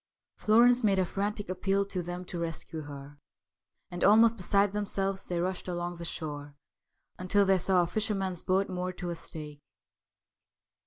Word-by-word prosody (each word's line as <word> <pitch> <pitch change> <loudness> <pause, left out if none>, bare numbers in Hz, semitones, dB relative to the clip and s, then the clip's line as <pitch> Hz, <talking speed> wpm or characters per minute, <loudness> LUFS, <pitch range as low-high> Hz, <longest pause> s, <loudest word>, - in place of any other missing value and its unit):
Florence 240 +3 +4
made 200 -3 +3
a 185 - +2
frantic 205 +3 -3
appeal 195 +2 0
to 190 -2 -4
them 175 +1 -6
to 175 -1 -6
rescue 165 -1 -4
her, 145 0 -10 0.7
and 175 0 -4
almost 225 +3 +6
beside 200 0 +2
themselves 195 -2 -1
they 175 -1 -2
rushed 185 +2 -2
along 175 0 -3
the 170 - -7
shore 145 -3 -6 0.6
until 200 +2 +3
they 190 -1 +3
saw 180 0 +3
a - - 0
fisherman's 195 -1 -1
boat 190 +1 +1
moored 180 -1 -4
to 175 -1 -4
a - - -3
stake. 150 -3 -8
185 Hz, 160 wpm, -29 LUFS, 170-200 Hz, 0.7 s, almost